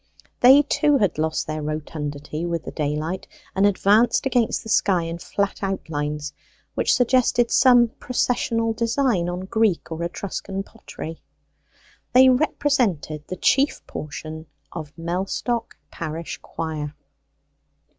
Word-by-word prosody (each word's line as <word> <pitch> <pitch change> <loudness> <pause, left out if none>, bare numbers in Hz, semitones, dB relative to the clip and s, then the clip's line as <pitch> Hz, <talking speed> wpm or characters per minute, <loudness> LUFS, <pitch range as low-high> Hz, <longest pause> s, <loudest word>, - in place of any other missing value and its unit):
They, 265 +4 +8
too, 295 0 +2
had 200 - 0
lost 160 0 0
their 155 0 -4
rotundity 150 0 -4
with 170 -2 -2
the - - -5
daylight, 155 +4 -3 0.3
and 195 +1 +4
advanced 205 +6 +3
against 245 -4 +1
the - - -10
sky 190 -5 +3
in 165 +1 -5
flat 200 +3 -2
outlines, 150 -6 -3 0.4
which - - +2
suggested 245 -1 +3
some 245 -3 +6
processional 230 -2 0
design 230 -5 +1
on 175 +1 -4
Greek 200 -3 0
or 165 +1 -3
Etruscan 195 +2 -4
pottery. 165 -7 -9 0.9
They 260 +1 +8
represented 250 - +1
the 185 - -5
chief 275 +2 +2
portion 155 +1 -7 0.2
of 155 -4 -7
Mellstock 190 +7 -2
parish 165 0 -5
choir. 155 -2 -5
185 Hz, 120 wpm, -23 LUFS, 155-235 Hz, 0.9 s, They